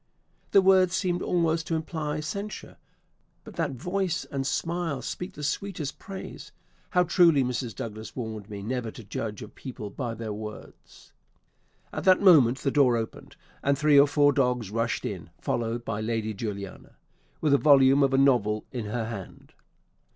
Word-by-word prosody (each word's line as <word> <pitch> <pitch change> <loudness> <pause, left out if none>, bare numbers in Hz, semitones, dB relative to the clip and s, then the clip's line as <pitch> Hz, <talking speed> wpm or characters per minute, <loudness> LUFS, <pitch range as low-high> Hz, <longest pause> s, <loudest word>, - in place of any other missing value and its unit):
"The 195 - +5
words 185 -1 +5
seemed 180 -2 0
almost 165 -2 0
to 165 - 0
imply 155 -1 -3
censure; 200 +7 -6 0.7
but - - -11
that 160 -5 -1
voice 180 +7 -2
and 135 -1 -3
smile 165 -2 -2
speak 180 +2 -5
the 150 - -9
sweetest 155 0 -3
praise. 195 -1 -9 0.4
How 180 -1 +3
truly 165 -5 +4
Mrs. 125 -2 -3
Douglas 110 -1 -7
warned 110 -4 -6
me 100 -1 -7
never 120 +1 -3
to 115 - -10
judge 105 +1 -5
of 105 - -12
people 110 -6 -8
by 120 -2 -4
their 110 -1 -5
words." 105 0 -10 0.8
At - - -4
that 185 -1 +6
moment 145 -11 +6
the 135 - -1
door 130 -5 +4
opened, 110 -1 -6 0.3
and 140 0 +1
three 150 0 +5
or 140 - +7
four 145 0 +4
dogs 125 -6 0
rushed 115 +1 -1
in, - - -5
followed 120 0 -2
by 110 -1 -3
Lady 110 -1 -2
Juliana, 100 -2 -7 0.4
with 150 -3 +2
a 140 - +5
volume 140 -2 +6
of 135 -1 +3
a 135 - +2
novel 120 -6 +3
in 120 -4 -4
her 110 +2 -2
hand. 105 -5 -9
135 Hz, 165 wpm, -27 LUFS, 115-160 Hz, 0.8 s, or